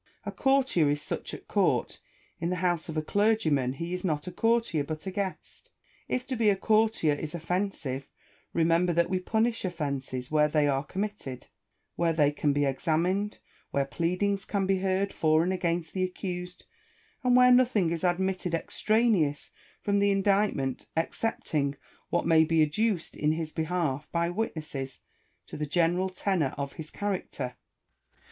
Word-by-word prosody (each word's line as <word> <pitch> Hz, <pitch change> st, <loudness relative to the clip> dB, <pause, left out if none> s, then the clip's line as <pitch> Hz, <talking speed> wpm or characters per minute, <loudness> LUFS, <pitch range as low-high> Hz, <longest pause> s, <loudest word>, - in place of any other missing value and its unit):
A -, -, -3 dB
courtier 265 Hz, -, +2 dB
is 145 Hz, 0 st, +1 dB
such -, -, -4 dB
at -, -, -9 dB
court: -, -, +1 dB, 0.4 s
in 170 Hz, -, -1 dB
the 180 Hz, -, 0 dB
house 175 Hz, -3 st, 0 dB
of 160 Hz, -, -4 dB
a 155 Hz, -, 0 dB
clergyman 160 Hz, -, +2 dB
he 170 Hz, +6 st, -5 dB
is 180 Hz, -, -3 dB
not 155 Hz, -4 st, -1 dB
a 180 Hz, -, -5 dB
courtier, 225 Hz, -6 st, +1 dB
but 155 Hz, +3 st, -6 dB
a 190 Hz, -, -3 dB
guest. 195 Hz, -1 st, -5 dB, 0.4 s
If 250 Hz, 0 st, -1 dB
to 260 Hz, -, -3 dB
be 225 Hz, -3 st, +3 dB
a 200 Hz, -, +4 dB
courtier 215 Hz, -6 st, +2 dB
is 150 Hz, +2 st, -5 dB
offensive, 165 Hz, -6 st, -2 dB, 0.4 s
remember 170 Hz, +2 st, +2 dB
that 170 Hz, +2 st, +2 dB
we 185 Hz, -, +1 dB
punish 225 Hz, +4 st, 0 dB
offences 140 Hz, -7 st, -3 dB
where 150 Hz, -1 st, +4 dB
they 150 Hz, -1 st, +2 dB
are 135 Hz, -1 st, +1 dB
committed, 190 Hz, -8 st, -5 dB, 0.5 s
where 170 Hz, -1 st, +2 dB
they 145 Hz, -2 st, +3 dB
can 145 Hz, 0 st, 0 dB
be 145 Hz, 0 st, +1 dB
examined, 175 Hz, +9 st, 0 dB, 0.3 s
where 140 Hz, -1 st, 0 dB
pleadings 180 Hz, +7 st, 0 dB
can 200 Hz, -1 st, -1 dB
be 190 Hz, 0 st, +2 dB
heard 190 Hz, +1 st, 0 dB
for 155 Hz, 0 st, +3 dB
and 185 Hz, +2 st, 0 dB
against 170 Hz, -2 st, -1 dB
the 185 Hz, -, 0 dB
accused, 180 Hz, -1 st, -5 dB, 0.6 s
and 250 Hz, -1 st, +4 dB
where 250 Hz, 0 st, +7 dB
nothing 240 Hz, -9 st, +4 dB
is 170 Hz, +1 st, -3 dB
admitted 180 Hz, -1 st, 0 dB
extraneous 200 Hz, -6 st, +1 dB, 0.3 s
from 200 Hz, 0 st, +2 dB
the 200 Hz, 0 st, +3 dB
indictment, 195 Hz, -9 st, +1 dB
excepting 155 Hz, -5 st, -1 dB, 0.3 s
what -, -, 0 dB
may 160 Hz, -1 st, +6 dB
be 160 Hz, 0 st, +3 dB
adduced 185 Hz, +4 st, 0 dB
in 150 Hz, +1 st, +1 dB
his 160 Hz, -1 st, -3 dB
behalf 160 Hz, -4 st, -1 dB
by 170 Hz, 0 st, 0 dB
witnesses 155 Hz, -, -4 dB, 0.4 s
to -, -, -9 dB
the 150 Hz, 0 st, -3 dB
general 175 Hz, +4 st, +2 dB
tenor 185 Hz, -6 st, -1 dB
of 140 Hz, -1 st, -4 dB
his 155 Hz, -1 st, -7 dB
character. 190 Hz, -10 st, -3 dB
Rousseau. -, -, -44 dB
175 Hz, 165 wpm, -28 LUFS, 155-195 Hz, 0.6 s, where